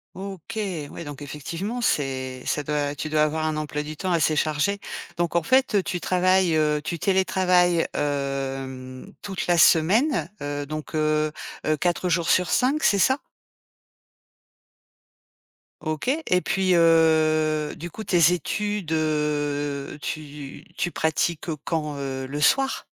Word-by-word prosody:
OK, 195 +3 -6 0.3
oui - - -7
donc 145 0 -8
effectivement, 170 - -5
c'est 130 - -1
ça 150 - 0
doit 145 0 -1
tu 155 +2 -5
dois 155 0 +3
avoir 155 +1 0
un 155 -1 -1
emploi 150 -1 -3
du 150 0 -7
temps 185 -1 -2
assez 155 -2 +2
chargé. 155 +7 +1 0.4
Donc 170 0 -1
en 170 - +4
fait, 260 +7 +2
heu, 200 - +4
tu 180 -2 -3
travailles, 185 -2 +2
heu, 150 -1 +2
tu 170 -1 -4
télétravailles, 180 -2 +2
hem, 135 0 -3
toute 195 -3 -4
la 175 -1 +3
semaine, 175 - +4
heu, 145 0 -4
donc, 155 +1 -6
heu, 155 0 +1 0.3
heu, 155 0 +1
4 175 +2 0
jours 170 -1 +1
sur 180 -1 +3
5, 275 +5 +2
c'est 200 -1 +4
ça? 265 +9 +4 2.6
OK 155 +7 -3
et 265 - +1
puis 185 -1 +1
heu, 155 -2 +3
du 170 +1 -7
coup 220 - -7
tes 175 -2 +4
études, 205 +1 -2
heu, 145 -2 -1
tu 145 -2 -7
tu 175 - -1
pratiques, 160 +1 -1
heu, 155 - -2
quand? 150 -3 -2
Heu, 135 -1 -4
le 145 +3 -5
soir? 270 - +2
155 Hz, 145 wpm, -24 LUFS, 150-180 Hz, 2.6 s, en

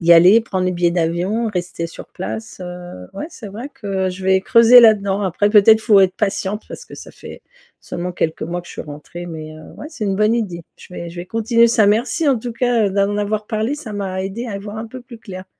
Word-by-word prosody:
y 170 0 +5
aller, 180 +7 +7
prendre 190 -5 -3
les 185 - 0
billets 175 -1 +1
d'avion, 180 +7 0
rester 180 -3 -4
sur - - -11
place, 220 +2 -7
heu, 175 - -8
ouais 300 - -6
c'est 225 -10 -10
vrai 230 +8 -7
que, 195 -3 -2
je 185 +1 -7
vais 190 0 +3
creuser 230 +5 +7
là-dedans. 205 -3 +4
Après 200 +2 +1
peut-être 220 +1 +6
faut 215 -3 +4
être 185 -1 +3
patiente, 205 0 -2
parce - - -9
que - - -11
ça - - -11
fait - - -12 0.4
seulement 180 +1 -5
quelques 160 -2 -2
mois 175 +2 -4
que - - -15
je - - -10
suis - - -7
rentrée 150 +4 -9
mais 155 -2 -8
heu, 155 0 -13
ouais 295 - -8
c'est 255 -9 -5
une 195 -2 -1
bonne 215 +3 +3
idée. 180 -8 -3 0.2
Je 180 - -14
vais 170 -1 -6
je 170 - -13
vais 175 +1 -6
continuer 230 +3 +3
ça, 225 -3 +3
merci 240 +10 +1
en 265 -4 +3
tout 240 +2 -6
cas, 235 -3 +1
d'en 200 +1 0
avoir 210 +1 -2
parlé 220 +5 -1
ça 255 -8 -8
m'a 190 -2 -3
aidée 230 +6 -5
à 205 - -4
y - - -5
voir 205 +2 -8
un 225 - -5
peu 255 +3 -9
plus 235 -1 -12
clair. 190 -3 -9
200 Hz, 245 wpm, -19 LUFS, 180-225 Hz, 0.4 s, aller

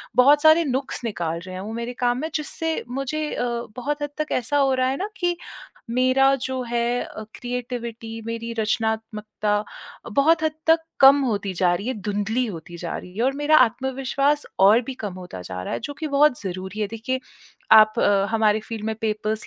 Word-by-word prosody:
बहुत 285 +4 +6
सारे 315 +2 +6
नुक्स 265 -1 -3
निकाल 170 -7 -2
रहे 185 +1 -9
हैं 185 - -5
वो 215 +3 -6
मेरे 235 +1 -4
काम 245 0 +2
में। 315 - -3
जिससे 320 +1 -1
मुझे 275 +4 -3
अ, 245 - -1 0.3
बहुत 290 +4 -3
हद 290 - -2
तक 305 0 -3
ऐसा 290 +5 -1
हो 270 -2 +3
रहा 255 0 +1
है 270 - -1
ना 405 +6 -3
कि 350 -1 0 0.5
मेरा 255 +2 +4
जो 260 -1 -2
है 240 0 0
अ, 215 - -8
क्रिएटिविटी 235 -2 -5
मेरी 230 0 -4
रचनात्मकता 215 -1 -1 0.5
बहुत 315 +3 +4
हद 315 -1 +1
तक 325 +1 +6 0.2
कम 275 +1 +8
होती 205 -6 -1
जा 175 0 +2
रही 200 +6 -4
है, 260 - -1
धुंधली 210 +4 -1
होती 175 -3 -8
जा 170 -1 -4
रही 180 +1 -10
है। 225 - 0
और 270 - +2
मेरा 295 +1 +4
आत्मविश्वास 265 +4 +1
और 205 +5 +6
भी 260 +2 -6
कम 205 -6 -6
होता 180 - -8
जा 90 0 -6
रहा - - -5
है - - -3
जो 290 - -5
कि 315 - -3
बहुत 285 -2 +3
ज़रूरी 190 +2 -5
है। 210 - +1
देखिए, 230 +4 -3 0.5
आप 215 0 +7
अ, 200 -1 +3
हमारे 220 -1 +2
फ़ील्ड 220 0 -7
में 220 - -1
पेपर्स 215 0 -2
235 Hz, 195 wpm, -23 LUFS, 210-275 Hz, 0.5 s, कम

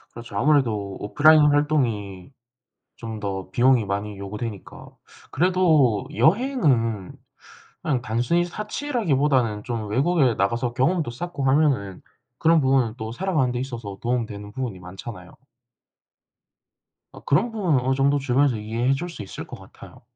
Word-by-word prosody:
그렇죠. 115 -3 -10
아무래도 115 -8 +1
오프라인 155 +8 +5
활동이 120 -10 -1 0.7
좀 110 -2 -7
더 95 -3 -4
비용이 120 +3 +3
많이 100 +1 -4
요구되니까 100 +1 -7 0.4
그래도 155 - +3
여행은 150 - +1 0.7
그냥 135 -5 0
단순히 120 +10 0
사치라기보다는 150 - -1
좀 115 -3 -4
외국에 135 +2 +2
나가서 115 +4 0
경험도 155 +3 +1
쌓고 150 +3 -6
하면은 135 -9 +1 0.4
그런 165 0 +4
부분은 130 -5 +2
또 110 -1 -5
살아가는데 150 -7 0
있어서 115 -7 -6
도움되는 110 -4 -3
부분이 120 -6 -4
많잖아요. 90 +1 -10 1.8
아 - - -11
그런 190 +12 +2
부분은 185 - +1
어느 130 +1 0
정도 140 +1 +2
주변에서 135 -1 +2
이해해 115 +5 -1
줄 175 +6 -4
수 170 - -9
있을 100 - -8
것 - - -10
같아요. - - -15
125 Hz, 325 characters per minute, -23 LUFS, 105-150 Hz, 1.8 s, 오프라인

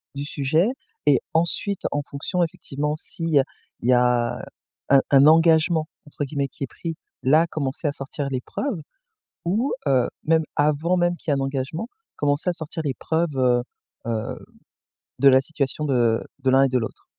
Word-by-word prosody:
du 140 - -4
sujet 155 - +1 0.4
et 140 -3 +5
ensuite, 170 +4 +3
en 145 - -1
fonction 175 +6 -1
effectivement 150 -2 -3
si, 165 - -4
il 165 - -1
y 140 - +7
a - - +4 0.4
il 120 - -1
y - - +6
a 120 -1 +2 0.5
un 135 0 +7
un 140 0 +7
«engagement» 160 0 +4 0.2
entre 145 - -5
guillemets 140 0 -2
qui - - -8
est 135 - -2
pris, 165 +5 -6 0.3
là, 155 +6 +4
commencer 150 -1 -3
à - - +1
sortir 140 0 -4
les 130 - -2
preuves 215 - -4 0.6
ou, 220 +10 0
heu, 130 -3 +3 0.2
même 160 0 +3
avant 150 +5 +2
même 175 0 +2
qu'il 155 - -3
y - - +3
ait - - -1
un - - -1
engagement, 135 - -3 0.3
commencer 145 +4 +1
à - - 0
sortir 160 -1 -4
les 140 - 0
preuves, 160 -2 -1
heu 125 -1 +3 0.5
heu, 110 -2 -3 0.8
de 140 - +7
la 130 0 +6
situation 145 0 -1
de 120 -5 +2 0.2
de 130 - +3
l'un 135 +1 +5
et - - +4
de 125 - +1
l'autre? 115 - -6
145 Hz, 190 wpm, -23 LUFS, 135-165 Hz, 0.8 s, y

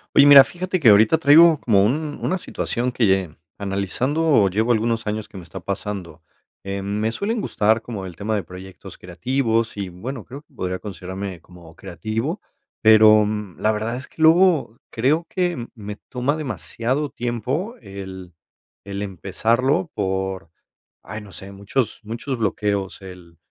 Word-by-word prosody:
Oye, 140 - +8
mira, 140 -1 +10
fíjate 185 +3 -3
que 130 -8 +6
ahorita 110 +8 +6
traigo 160 +1 +7
como 100 -5 +3
un 145 +7 -1
una 185 - 0
situación 125 -6 -2
que 120 -1 +1
lle 95 -5 +1 0.2
analizando 105 - +1
llevo 110 +6 +1
algunos 115 0 0
años, 105 0 -3
que - - -11
me 90 - -8
está 90 +3 -9
pasando. 95 -2 -5 0.4
Em, 100 0 -4
me 110 +1 0
suelen 215 - -2
gustar 110 - +1
como 105 -5 -6
el 90 - -10
tema 110 +2 -3
de 105 - 0
proyectos 90 +2 -11
creativos 115 +5 -1
y, 100 -2 -4
bueno, 115 +7 -7
creo 140 +3 -10
que 150 - -33
podría 95 -6 -3
considerarme 95 -1 -7
como 85 -2 -16
creativo, 110 - -4 0.4
pero, 110 -1 +7
mm, 105 -4 -4
la 110 - +2
verdad 110 +2 -2
es 130 - -7
que - - -12
luego 160 - +4
creo 145 +8 +1
que 175 -10 -2
me 105 -2 -7
toma 130 +4 -1
demasiado 130 - -2
tiempo 125 - -3
el 95 -2 -9 0.5
el 100 0 -5
empezarlo 115 - 0
por, 95 -2 -3 0.5
ay, 105 +4 -7
no 105 -2 -13
sé, 95 +1 -10
muchos 100 +5 -2
muchos 115 +5 -4
bloqueos, 100 -3 -2
el 90 -3 -12
110 Hz, 160 wpm, -22 LUFS, 95-130 Hz, 0.5 s, mira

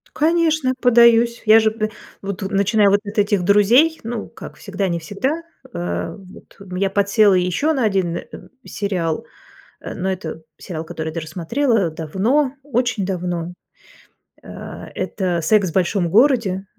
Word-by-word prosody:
Конечно, 315 -4 +2
подаюсь. 235 -1 +4
Я 220 +1 +7
же 220 0 +2
б 215 0 -3 0.3
вот, 200 0 -5
начиная 200 +2 +2
вот 200 +1 +3
от 205 +2 -7
этих 205 -2 +2
друзей, 230 - +4
ну, 230 -1 -5
как - - -11
всегда- 200 -1 -3
не 170 -1 -1
всегда, 260 - -3 0.3
а 85 0 -4
вот 190 -1 -16 0.2
я 195 +1 0
подсела 200 +1 +3
еще 180 - +1
на 265 -6 0
один, 190 -5 0
э, - - -7 0.4
сериал, 180 -6 -3 0.6
э - - -7
но 190 - -2
это 165 -4 -6 0.2
сериал, 165 -3 -6
который 160 0 -5
я - - -8
даже 160 -1 -5
смотрела 225 - 0
давно, 200 - 0
очень 245 -6 -1
давно. 180 -2 -3 0.9
А, - - -9
это 180 -4 -2
"Секс 195 +3 +2
в - - -16
большом 185 -1 +1
городе". 215 - +2
200 Hz, 150 wpm, -20 LUFS, 180-235 Hz, 0.9 s, Я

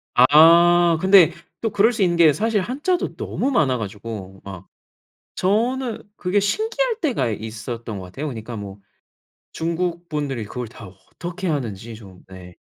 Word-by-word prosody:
아. 170 +5 +6
근데 190 -3 +6 0.3
또 225 - 0
그럴 215 +3 +3
수 220 - -3
있는 175 -2 +1
게 160 -3 +6
사실 215 +3 0
한자도 295 - -2
너무 275 - -2
많아 135 - +2
가지고 100 -2 -7
막. 95 -2 -10 0.7
저는 235 +5 0
그게 185 +2 +1
신기할 445 - -1
때가 245 - 0
있었던 110 +1 -6
것 95 - -8
같아요. 135 +12 -6
그러니까 120 -3 -7
뭐 100 -1 -8 0.8
중국분들이 165 -6 -3
그걸 125 +3 -6
다 110 -2 -12
어떻게 175 - -8
하는지 115 - -4
좀. 95 -4 -14
네. 90 -2 -12
155 Hz, 285 characters per minute, -21 LUFS, -, 0.8 s, 아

